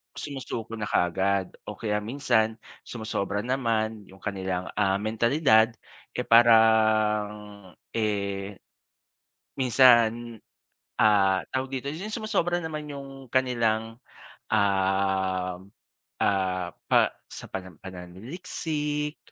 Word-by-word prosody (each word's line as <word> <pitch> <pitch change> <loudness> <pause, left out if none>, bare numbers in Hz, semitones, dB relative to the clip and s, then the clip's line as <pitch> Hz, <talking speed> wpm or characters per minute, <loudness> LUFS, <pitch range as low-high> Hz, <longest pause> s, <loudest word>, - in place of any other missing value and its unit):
sumusuko 120 -5 -5
na 110 - -5
kaagad 95 +2 +1 0.2
o - - -3
kaya 105 -1 0
minsan 110 -3 +1 0.3
sumosobra 105 -3 -3
naman, 115 -4 -1
'yong 95 - -16
kanilang, 95 -2 -3
ah, 100 -1 +2
mentalidad, 110 +1 +3 0.4
eh, 125 - -2
parang, 110 -3 +3 0.2
eh, 100 -2 -2 1.0
minsan, 120 -3 +4 0.6
ah 95 -3 +4
tawag 130 0 -2
dito, - - -11
'yong 185 +7 -6
sumosobra 200 -6 0
naman 155 -2 -5
'yong 140 -1 -7 0.2
kanilang, 115 -3 0 0.5
uhm, 95 -2 0 0.5
ah, 95 -2 +1 0.2
pa - - +7 0.3
sa - - -7
panam 95 -3 -6
pananaliksik, 150 - -4
110 Hz, 95 wpm, -26 LUFS, 100-125 Hz, 1.0 s, pa